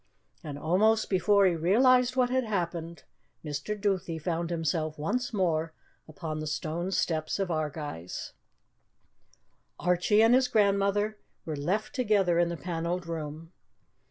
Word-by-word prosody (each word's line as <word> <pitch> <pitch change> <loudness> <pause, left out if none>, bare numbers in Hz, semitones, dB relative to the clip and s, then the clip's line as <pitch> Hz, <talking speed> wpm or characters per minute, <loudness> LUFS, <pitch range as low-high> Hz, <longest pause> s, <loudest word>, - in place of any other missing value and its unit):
And 145 -3 -6
almost 210 +9 +2
before 200 +2 +4
he 185 - +4
realized 250 +9 +4
what 250 -1 +2
had 260 0 +2
happened, 170 -5 -3 0.4
Mr. 150 +9 -4
Duthie 190 -5 -1
found 165 +1 -2
himself 160 -2 -1
once 235 +12 -2
more 165 -6 0 0.3
upon 155 0 -5
the 155 - -4
stone 160 +4 -3
steps 160 -4 -1
of 195 -3 -1
Ardguys. 150 - -4 1.5
Archie 180 +5 +3
and 225 +2 +5
his 255 0 +4
grandmother 205 -1 +1 0.3
were 155 - -3
left 185 +10 -2
together 205 -9 +2
in 175 0 +3
the 170 - -4
panelled 175 +1 -3
room. 160 0 -6
175 Hz, 130 wpm, -28 LUFS, 160-210 Hz, 1.5 s, and